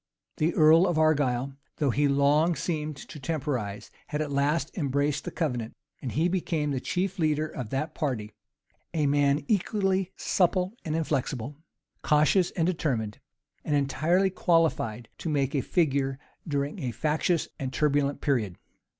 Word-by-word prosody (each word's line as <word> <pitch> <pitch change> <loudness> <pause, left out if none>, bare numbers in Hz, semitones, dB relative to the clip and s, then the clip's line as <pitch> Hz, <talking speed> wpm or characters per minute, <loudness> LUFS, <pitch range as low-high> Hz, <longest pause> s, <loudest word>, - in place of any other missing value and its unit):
The 160 +2 +1
earl 160 +3 +6
of 175 -3 0
Argyle, 140 -4 +2 0.2
though 145 -4 +2
he 145 +4 +2
long 145 +4 +3
seemed 155 -4 -3
to 150 +2 -10
temporize, 130 -8 -3 0.2
had 150 - -3
at 150 -2 -2
last 145 +3 0
embraced 145 -1 0
the - - -2
covenant; 125 -9 -2 0.3
and 130 - -4
he 160 +4 +2
became 165 -5 -1
the 135 - -1
chief 185 +8 -2
leader 155 -1 +1
of 125 -7 -6
that 140 +6 -2
party; 125 -9 -2 0.6
a 155 -2 +2
man 145 0 +2
equally 195 -3 +1
supple 185 +1 +1
and 155 -1 -2
inflexible, 135 -4 -2 0.5
cautious 155 +5 +3
and 165 -4 +1
determined, 130 - -1 0.4
and 150 - 0
entirely 165 +7 +2
qualified 160 - +1
to 165 - -3
make 140 -3 0
a 140 - +1
figure 140 -4 +1 0.3
during 145 -1 -2
a 130 - -2
factious 155 +6 0
and 135 -2 -3
turbulent 145 0 +1
period. 115 - 0
150 Hz, 150 wpm, -27 LUFS, 135-165 Hz, 0.6 s, earl